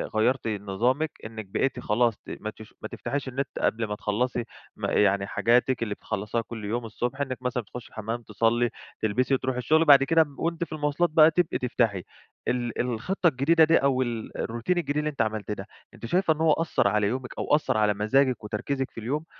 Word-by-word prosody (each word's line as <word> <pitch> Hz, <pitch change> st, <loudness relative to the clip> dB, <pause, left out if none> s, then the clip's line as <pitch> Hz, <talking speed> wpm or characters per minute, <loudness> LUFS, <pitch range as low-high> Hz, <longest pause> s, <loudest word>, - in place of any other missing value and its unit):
غيّرتِ 120 Hz, +3 st, +2 dB
نظامِك 110 Hz, +9 st, 0 dB
إنِّك 110 Hz, -1 st, -7 dB
بقيتِ 125 Hz, +7 st, -1 dB
خلاص 115 Hz, 0 st, +1 dB
ما 110 Hz, -, -5 dB
تش 110 Hz, 0 st, -12 dB
ما -, -, -4 dB
تفتحيش 140 Hz, -1 st, -4 dB
النت 135 Hz, +1 st, -2 dB
قبل 115 Hz, +1 st, +1 dB
ما 105 Hz, 0 st, -4 dB
تخلّصي 120 Hz, +4 st, -1 dB, 0.3 s
ما -, -, -3 dB
يعني 100 Hz, -1 st, +3 dB
حاجاتِك 125 Hz, +1 st, +2 dB
اللي 105 Hz, -2 st, -2 dB
بتخلصيها 105 Hz, +4 st, -3 dB
كل 110 Hz, -1 st, -8 dB
يوم 115 Hz, +3 st, -2 dB
الصبح، 120 Hz, +4 st, -3 dB
إنِّك 130 Hz, -2 st, -3 dB
مثلًا 125 Hz, -1 st, -2 dB
تخشي 110 Hz, +2 st, -10 dB
الحمام، 115 Hz, +2 st, -4 dB
تصلي، 115 Hz, +3 st, +1 dB, 0.3 s
تلبسي 125 Hz, +5 st, +1 dB
وتروحي 130 Hz, -1 st, 0 dB
الشغل، 155 Hz, +6 st, +3 dB
وبعد 140 Hz, -4 st, +7 dB
كده 165 Hz, +4 st, 0 dB, 0.2 s
وأنتِ 170 Hz, +1 st, -1 dB
في 165 Hz, -, -8 dB
المواصلات 155 Hz, +3 st, 0 dB
بقى 155 Hz, +1 st, +6 dB
تبقي 175 Hz, -2 st, +1 dB
تفتحي 115 Hz, -7 st, 0 dB, 0.4 s
ال 120 Hz, -1 st, -1 dB
الخطّة 125 Hz, -, 0 dB
الجديدة 160 Hz, +4 st, +4 dB
دي 160 Hz, +1 st, +5 dB
أو 135 Hz, -2 st, +2 dB
ال 115 Hz, -3 st, -4 dB
الروتين 120 Hz, +11 st, -1 dB
الجديد 145 Hz, -3 st, -1 dB
اللي 150 Hz, 0 st, 0 dB
أنتِ 140 Hz, -5 st, -2 dB
عملتيه 110 Hz, -1 st, -2 dB
ده، 95 Hz, 0 st, -7 dB, 0.3 s
أنتِ 115 Hz, 0 st, -9 dB
شايفة 175 Hz, +3 st, +2 dB
إن 155 Hz, -, -11 dB
هو 160 Hz, -1 st, +4 dB
أثّر 165 Hz, -10 st, +1 dB
على 105 Hz, 0 st, +2 dB
يومِك 125 Hz, +2 st, -3 dB
أو 150 Hz, -, +2 dB
أثّر 150 Hz, -, 0 dB
على 105 Hz, -1 st, +3 dB
مزاجِك 125 Hz, +4 st, +2 dB
وتركيزِك 130 Hz, +6 st, -3 dB
في -, -, -8 dB
اليوم، 145 Hz, +8 st, -3 dB
125 Hz, 195 wpm, -26 LUFS, 110-140 Hz, 0.4 s, وبعد